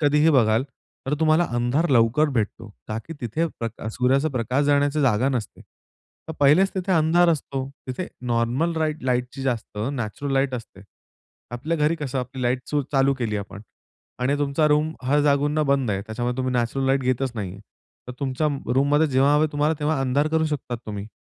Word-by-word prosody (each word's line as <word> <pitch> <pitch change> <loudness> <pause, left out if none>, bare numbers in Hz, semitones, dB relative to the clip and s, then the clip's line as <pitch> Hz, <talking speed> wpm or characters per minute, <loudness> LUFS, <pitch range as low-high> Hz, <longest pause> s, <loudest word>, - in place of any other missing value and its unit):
कधीही 150 +1 +4
बघाल 115 -5 +3 0.4
तर 140 - +1
तुम्हाला 160 +2 +4
अंधार 120 +8 +1
लवकर 125 +5 +4
भेटतो 110 0 -2 0.2
का 110 - -3
की 165 - -7
तिथे 135 +7 -1
प्रका 115 -1 -5
सूर्याचा 130 +6 +1
प्रकाश 130 +1 0
जाण्याची 145 +1 +2
जागा 130 -2 +2
नसते. 125 -6 -4 0.7
तर - - -3
पहिलेच 155 +8 +5
तिथे 190 0 -1
अंधार 170 +1 +4
असतो, 135 -4 -1 0.2
तिथे 130 +8 -4 0.2
नॉर्मल 120 +8 +1
राईट 155 -1 -1
लाईटची 125 +1 -1
जास्त 120 -5 -3
नॅचरल 135 +2 -4
लाईट 135 -1 +1
असते. 115 -5 -8 0.7
आपल्या 150 +8 -2
घरी 150 +2 +2
कसं 140 -4 -3
आपली 130 +1 -5
लाईट 125 +1 +1
चू 145 -1 0
चालू 135 0 +3
केली 110 -4 -1
आपण 100 -1 -7 0.6
आणि 135 +3 +1
तुमचा 145 +2 +1
रूम 150 +1 +2
हर 145 +3 +3
जागूंना 145 +1 +2
बंद 135 -5 +1
आहे, 95 0 -1
त्याच्यामध्ये 120 +3 -3
तुम्ही 130 -1 -1
नॅचरल 125 +2 0
लाईट 135 +1 +2
घेतच 130 0 0
नाहीये. 100 -4 -5 0.5
तर - - -4
तुमच्या 140 +2 -1 0.3
रूममध्ये 145 +4 +3
जेव्हा 140 +1 +3
हवंय 150 +1 +4
तुम्हाला 150 +2 +1
तेव्हा 150 -1 0
अंधार 135 +3 +1
करू 160 0 +1
शकतात 135 -5 -4
तुम्ही. 105 -1 -5
135 Hz, 175 wpm, -23 LUFS, 120-150 Hz, 0.7 s, पहिलेच